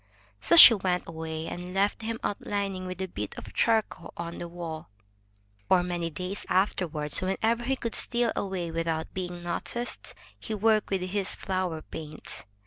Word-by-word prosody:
So -, -, +3 dB
she 285 Hz, -8 st, +13 dB
went 185 Hz, -4 st, -1 dB
away 160 Hz, -1 st, -5 dB
and 180 Hz, +2 st, -7 dB
left 200 Hz, +3 st, +1 dB
him 225 Hz, +1 st, -4 dB
outlining 195 Hz, -2 st, -3 dB
with 185 Hz, +1 st, -5 dB
a -, -, -3 dB
bit 105 Hz, -, -6 dB
of -, -, -9 dB
char 225 Hz, -1 st, +3 dB
coal 170 Hz, -, -13 dB
on 170 Hz, 0 st, -6 dB
the 170 Hz, -, -5 dB
wall. 165 Hz, -, -7 dB, 0.8 s
For 180 Hz, -2 st, +5 dB
many 175 Hz, -2 st, -2 dB
days 180 Hz, +5 st, -4 dB
afterward, 175 Hz, -6 st, 0 dB
whenever 225 Hz, +5 st, 0 dB
he 270 Hz, +2 st, +1 dB
could 230 Hz, -3 st, -4 dB
steal 240 Hz, -1 st, +2 dB
away 185 Hz, -4 st, -3 dB
without 165 Hz, -1 st, -2 dB
being 175 Hz, -2 st, -5 dB
noticed, 240 Hz, +7 st, -4 dB, 0.2 s
he 220 Hz, -, -4 dB
worked 215 Hz, 0 st, +2 dB
with 195 Hz, -2 st, -1 dB
his 190 Hz, +1 st, 0 dB
flower 185 Hz, -4 st, -3 dB
paints. 155 Hz, -1 st, -8 dB
185 Hz, 165 wpm, -27 LUFS, 170-205 Hz, 0.8 s, she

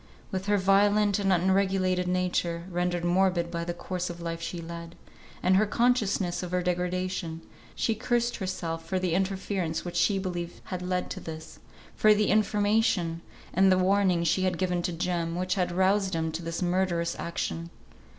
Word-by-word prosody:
With 190 Hz, +1 st, -3 dB
her 205 Hz, 0 st, +3 dB
violent 205 Hz, +1 st, +3 dB
and 195 Hz, -1 st, +1 dB
unregulated 185 Hz, 0 st, +2 dB
nature, 180 Hz, -2 st, 0 dB
rendered 175 Hz, 0 st, -1 dB
morbid 175 Hz, -1 st, +2 dB
by 170 Hz, -1 st, -2 dB
the 175 Hz, -, -3 dB
course 180 Hz, 0 st, -4 dB
of 175 Hz, 0 st, -7 dB
life 165 Hz, -1 st, -4 dB
she 175 Hz, +1 st, -4 dB
led, 170 Hz, 0 st, -8 dB, 0.5 s
and 185 Hz, -, +4 dB
her 215 Hz, +2 st, +3 dB
consciousness 210 Hz, -6 st, +1 dB
of 180 Hz, -, -5 dB
her 180 Hz, 0 st, 0 dB
degradation, 180 Hz, -1 st, -2 dB, 0.3 s
she 225 Hz, -, +1 dB
cursed 240 Hz, +1 st, 0 dB
herself 175 Hz, -4 st, -3 dB
for 185 Hz, +3 st, -2 dB
the 180 Hz, -2 st, 0 dB
interference 190 Hz, -3 st, -1 dB
which 175 Hz, -, -5 dB
she 175 Hz, +4 st, +3 dB
believed 175 Hz, -2 st, -4 dB
had 185 Hz, -2 st, -5 dB
led 180 Hz, 0 st, -2 dB
to 185 Hz, -, -4 dB
this; 160 Hz, -2 st, -9 dB, 0.4 s
for 215 Hz, 0 st, +5 dB
the 210 Hz, 0 st, +2 dB
information 205 Hz, -5 st, +2 dB, 0.3 s
and 190 Hz, +1 st, +5 dB
the 185 Hz, -, +5 dB
warning 185 Hz, -2 st, +3 dB
she 170 Hz, +3 st, +2 dB
had 185 Hz, 0 st, 0 dB
given 180 Hz, -2 st, 0 dB
to 175 Hz, -, -2 dB
Jem, 170 Hz, 0 st, -2 dB
which 185 Hz, +1 st, 0 dB
had 180 Hz, -2 st, 0 dB
roused 190 Hz, +1 st, +2 dB
him 160 Hz, 0 st, -1 dB
to 160 Hz, +2 st, -4 dB
this 165 Hz, +2 st, -3 dB
murderous 175 Hz, -2 st, 0 dB
action. 170 Hz, 0 st, -3 dB
180 Hz, 175 wpm, -28 LUFS, 170-195 Hz, 0.5 s, for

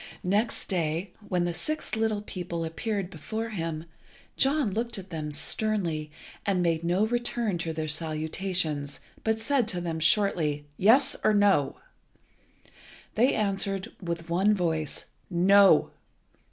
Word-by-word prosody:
Next 210 Hz, +5 st, +1 dB
day, 170 Hz, 0 st, -1 dB
when 180 Hz, -4 st, -1 dB
the 175 Hz, -, -1 dB
six 305 Hz, -, -2 dB
little 220 Hz, -2 st, 0 dB
people 175 Hz, -4 st, -4 dB
appeared 195 Hz, +3 st, -3 dB
before 220 Hz, +8 st, -4 dB
him, 165 Hz, -5 st, -4 dB, 0.5 s
John 275 Hz, -4 st, +2 dB
looked 230 Hz, +3 st, -2 dB
at 190 Hz, -1 st, -9 dB
them 155 Hz, -2 st, -4 dB
sternly, 165 Hz, -2 st, -1 dB, 0.3 s
and 190 Hz, -3 st, +1 dB
made 165 Hz, -1 st, +1 dB
no 180 Hz, +5 st, +2 dB
return 240 Hz, -4 st, -1 dB
to 165 Hz, -1 st, -2 dB
their 155 Hz, -1 st, -3 dB
salutations, 155 Hz, -1 st, -1 dB, 0.2 s
but 220 Hz, 0 st, +1 dB
said 250 Hz, 0 st, +1 dB
to 180 Hz, -5 st, -1 dB
them 165 Hz, -2 st, -3 dB
shortly 155 Hz, -4 st, +2 dB
"Yes, 260 Hz, -, +4 dB
or 215 Hz, -, +4 dB
No?" 200 Hz, -9 st, +3 dB, 1.4 s
They 245 Hz, +5 st, +3 dB
answered, 195 Hz, -2 st, 0 dB
with 170 Hz, -2 st, -4 dB
one 190 Hz, +5 st, +3 dB
voice, 160 Hz, -5 st, -2 dB, 0.2 s
"No." 190 Hz, -1 st, +5 dB
185 Hz, 130 wpm, -27 LUFS, 165-215 Hz, 1.4 s, No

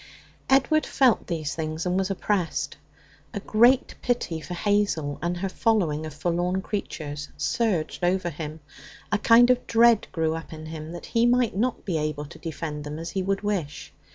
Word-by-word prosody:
Edward 275 Hz, +4 st, +4 dB
felt 255 Hz, -4 st, +2 dB
these 155 Hz, -5 st, -2 dB
things 160 Hz, +1 st, -3 dB
and 180 Hz, 0 st, 0 dB
was 190 Hz, 0 st, 0 dB
oppressed. 195 Hz, -3 st, -1 dB, 0.6 s
A -, -, -1 dB
great 240 Hz, +6 st, +4 dB
pity 235 Hz, -10 st, -1 dB
for 175 Hz, +4 st, -6 dB
Hazel 190 Hz, -7 st, 0 dB
and 175 Hz, +1 st, -1 dB
her 195 Hz, +2 st, -2 dB
following 180 Hz, -8 st, +1 dB
of 155 Hz, -, -8 dB
forlorn 175 Hz, +4 st, -1 dB
creatures 150 Hz, -7 st, -5 dB
surged 195 Hz, -8 st, -1 dB
over 175 Hz, 0 st, +1 dB
him. 155 Hz, +1 st, -7 dB, 0.5 s
A 205 Hz, -, +2 dB
kind 240 Hz, +3 st, +6 dB
of 250 Hz, 0 st, 0 dB
dread 230 Hz, -1 st, +5 dB
grew 160 Hz, -2 st, 0 dB
up 165 Hz, 0 st, -7 dB
in 155 Hz, 0 st, -8 dB
him 155 Hz, 0 st, -7 dB
that 175 Hz, -, -8 dB
he 235 Hz, 0 st, +2 dB
might 245 Hz, -3 st, +2 dB
not 240 Hz, +5 st, -1 dB
be 170 Hz, -5 st, 0 dB
able 150 Hz, -1 st, -2 dB
to -, -, -13 dB
defend 155 Hz, -2 st, -5 dB
them 150 Hz, +1 st, -6 dB
as 165 Hz, +1 st, -5 dB
he 190 Hz, -, -1 dB
would 195 Hz, +1 st, -1 dB
wish. 185 Hz, -11 st, -3 dB
180 Hz, 180 wpm, -25 LUFS, 155-215 Hz, 0.6 s, kind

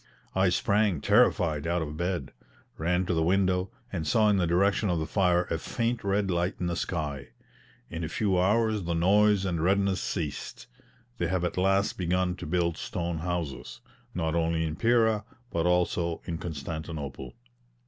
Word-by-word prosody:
I 95 Hz, 0 st, +3 dB
sprang 100 Hz, -1 st, +2 dB
terrified 85 Hz, -8 st, +3 dB
out 85 Hz, -1 st, 0 dB
of 75 Hz, -1 st, -6 dB
bed, 85 Hz, -4 st, -2 dB, 0.5 s
ran 90 Hz, +3 st, +1 dB
to 90 Hz, -, 0 dB
the 80 Hz, -, +1 dB
window, 95 Hz, +2 st, +2 dB, 0.2 s
and 80 Hz, -4 st, -3 dB
saw 105 Hz, +7 st, +4 dB
in 105 Hz, -, +3 dB
the 90 Hz, -3 st, +1 dB
direction 100 Hz, +4 st, +2 dB
of 90 Hz, -, +1 dB
the 80 Hz, -, -1 dB
fire 90 Hz, -1 st, +2 dB
a 80 Hz, -, 0 dB
faint 115 Hz, +5 st, -2 dB
red 100 Hz, 0 st, +1 dB
light 90 Hz, +3 st, 0 dB
in 90 Hz, -, -2 dB
the 85 Hz, 0 st, -1 dB
sky. 75 Hz, -6 st, -3 dB, 0.6 s
In 85 Hz, 0 st, -5 dB
a 80 Hz, -, -3 dB
few 95 Hz, -1 st, +1 dB
hours 110 Hz, +3 st, +2 dB
the 85 Hz, 0 st, -1 dB
noise 100 Hz, +3 st, +4 dB
and 85 Hz, -4 st, -1 dB
redness 95 Hz, +1 st, +2 dB
ceased. 75 Hz, -7 st, -4 dB, 0.5 s
They 85 Hz, -, +1 dB
have 90 Hz, 0 st, -1 dB
at 90 Hz, -, -1 dB
last 95 Hz, +2 st, +1 dB
begun 90 Hz, 0 st, 0 dB
to -, -, -7 dB
build 85 Hz, -2 st, 0 dB
stone 85 Hz, -2 st, -3 dB
houses, 85 Hz, -4 st, -4 dB, 0.4 s
not 80 Hz, -2 st, -1 dB
only 85 Hz, -1 st, +1 dB
in 80 Hz, -1 st, -3 dB
Pera 110 Hz, -1 st, +2 dB, 0.3 s
but 85 Hz, 0 st, 0 dB
also 85 Hz, -1 st, 0 dB
in 80 Hz, -1 st, -4 dB
Constantinople. 80 Hz, -2 st, -6 dB
90 Hz, 170 wpm, -28 LUFS, 80-100 Hz, 0.6 s, saw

